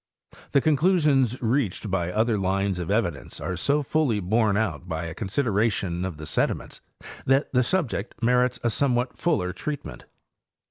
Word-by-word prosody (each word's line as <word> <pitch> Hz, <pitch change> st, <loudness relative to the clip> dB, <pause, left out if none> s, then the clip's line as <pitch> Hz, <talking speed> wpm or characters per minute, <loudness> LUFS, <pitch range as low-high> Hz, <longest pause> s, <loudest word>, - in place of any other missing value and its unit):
The 140 Hz, -, +5 dB
con 155 Hz, +1 st, +3 dB
clusions 145 Hz, -, +3 dB
reached 115 Hz, -4 st, 0 dB
by 90 Hz, -2 st, 0 dB
other 110 Hz, +3 st, +1 dB
lines 95 Hz, -1 st, 0 dB
of 85 Hz, -, -4 dB
evidence 100 Hz, -, -1 dB
are 90 Hz, -, -3 dB
so 140 Hz, -, +1 dB
fully 140 Hz, -7 st, +1 dB
borne 105 Hz, +2 st, +2 dB
out 110 Hz, -5 st, -2 dB
by 80 Hz, 0 st, -2 dB
a 80 Hz, -, -5 dB
consideration 100 Hz, -4 st, 0 dB
of 90 Hz, -5 st, -5 dB
the 75 Hz, -, -8 dB
sediments -, -, -1 dB, 0.5 s
that 135 Hz, +2 st, +2 dB
the 125 Hz, -, +4 dB
subject 130 Hz, -, -1 dB
merits 125 Hz, +1 st, +2 dB
a 120 Hz, -, +2 dB
somewhat 125 Hz, -1 st, 0 dB
fuller 120 Hz, -, 0 dB
treatment. 145 Hz, +7 st, -6 dB
115 Hz, 155 wpm, -25 LUFS, 95-135 Hz, 0.5 s, The